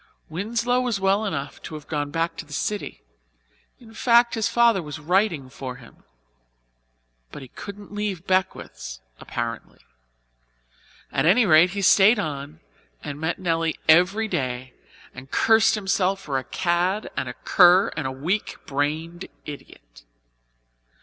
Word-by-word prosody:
Winslow 230 Hz, +8 st, -1 dB
was 240 Hz, -5 st, -1 dB
well 195 Hz, +3 st, +2 dB
enough 155 Hz, -8 st, -4 dB
to 155 Hz, -, -8 dB
have 150 Hz, -1 st, -9 dB
gone 145 Hz, -2 st, -3 dB
back 165 Hz, +2 st, -2 dB
to -, -, -6 dB
the 150 Hz, -2 st, -13 dB
city 205 Hz, -, -4 dB, 0.8 s
and, 235 Hz, -, -16 dB
in -, -, -15 dB
fact, 235 Hz, +1 st, +4 dB
his 225 Hz, -2 st, 0 dB
father 235 Hz, -5 st, +3 dB
was 150 Hz, -2 st, -7 dB
writing 170 Hz, -2 st, 0 dB
for 130 Hz, -1 st, -7 dB
him. 125 Hz, -2 st, -17 dB, 1.3 s
But -, -, -9 dB
he 130 Hz, -, -12 dB
couldn't 205 Hz, +5 st, -10 dB
leave 205 Hz, -4 st, -3 dB
Beckwiths', 185 Hz, -, -2 dB, 0.2 s
apparently. 115 Hz, -2 st, -5 dB, 1.3 s
At 135 Hz, -, +1 dB
any 220 Hz, +7 st, +5 dB
rate 165 Hz, 0 st, +6 dB
he 200 Hz, -, -1 dB
stayed 200 Hz, +5 st, +6 dB
on 140 Hz, -, -5 dB, 0.4 s
and 145 Hz, 0 st, -6 dB
met 160 Hz, +1 st, -1 dB
Nelly 165 Hz, -3 st, -1 dB
every 185 Hz, +7 st, +4 dB
day 130 Hz, -6 st, -3 dB, 0.4 s
and 130 Hz, +2 st, -11 dB
cursed 225 Hz, +6 st, +4 dB
himself 195 Hz, -1 st, 0 dB
for 140 Hz, -7 st, -2 dB
a 130 Hz, -, -10 dB
cad 180 Hz, +3 st, -1 dB
and 130 Hz, -, -3 dB
a 125 Hz, -, -7 dB
cur 180 Hz, +1 st, +5 dB
and 150 Hz, -4 st, -2 dB
a -, -, -3 dB
weak 165 Hz, +11 st, -2 dB
brained 155 Hz, +5 st, -3 dB, 0.2 s
idiot. -, -, -12 dB
175 Hz, 145 wpm, -24 LUFS, 145-205 Hz, 1.3 s, rate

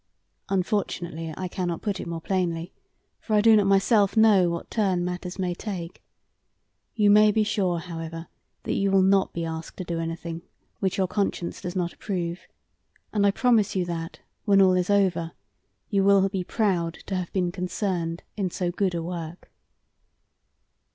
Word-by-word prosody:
"Unfortunately 175 Hz, -4 st, -2 dB
I 185 Hz, -, -3 dB
cannot 175 Hz, -1 st, -3 dB
put 205 Hz, -3 st, -2 dB
it -, -, -6 dB
more 165 Hz, -1 st, -4 dB
plainly, 175 Hz, -2 st, -2 dB, 0.5 s
for 215 Hz, -, -1 dB
I 210 Hz, -, +5 dB
do 225 Hz, +1 st, +7 dB
not 205 Hz, -2 st, +4 dB
myself 200 Hz, +1 st, +3 dB
know 205 Hz, -5 st, +6 dB
what 170 Hz, 0 st, -5 dB
turn 190 Hz, -5 st, +1 dB
matters 180 Hz, +1 st, -5 dB
may 180 Hz, -2 st, -1 dB
take. 175 Hz, -3 st, -6 dB, 0.9 s
You 210 Hz, -3 st, +4 dB
may 210 Hz, +1 st, +7 dB
be 215 Hz, +1 st, +2 dB
sure, 200 Hz, -5 st, 0 dB
however, 165 Hz, -1 st, -6 dB, 0.4 s
that -, -, -2 dB
you 195 Hz, 0 st, +1 dB
will 195 Hz, -1 st, +4 dB
not 195 Hz, 0 st, +3 dB
be 170 Hz, -1 st, -3 dB
asked 160 Hz, 0 st, -6 dB
to 185 Hz, -, -4 dB
do 170 Hz, -1 st, -3 dB
anything 165 Hz, 0 st, -4 dB, 0.4 s
which 190 Hz, -2 st, -1 dB
your 190 Hz, -, +2 dB
conscience 185 Hz, -2 st, -2 dB
does 180 Hz, +1 st, -5 dB
not 175 Hz, -2 st, -1 dB
approve; 175 Hz, -3 st, -4 dB, 0.7 s
and 205 Hz, -2 st, +3 dB
I -, -, +6 dB
promise 220 Hz, -1 st, +2 dB
you 185 Hz, -2 st, +1 dB
that, 165 Hz, -1 st, -5 dB, 0.2 s
when 200 Hz, -2 st, +4 dB
all 190 Hz, -1 st, +6 dB
is 180 Hz, 0 st, 0 dB
over, 180 Hz, -5 st, +2 dB, 0.6 s
you 200 Hz, -2 st, +3 dB
will 195 Hz, 0 st, +5 dB
be 190 Hz, -2 st, -2 dB
proud 175 Hz, -5 st, 0 dB
to -, -, -5 dB
have 180 Hz, -2 st, -3 dB
been 180 Hz, -2 st, 0 dB
concerned 180 Hz, -2 st, -3 dB
in 195 Hz, -3 st, -1 dB
so 175 Hz, 0 st, -2 dB
good 185 Hz, 0 st, 0 dB
a 165 Hz, -, -2 dB
work." 170 Hz, 0 st, -7 dB
185 Hz, 170 wpm, -25 LUFS, 170-200 Hz, 0.9 s, do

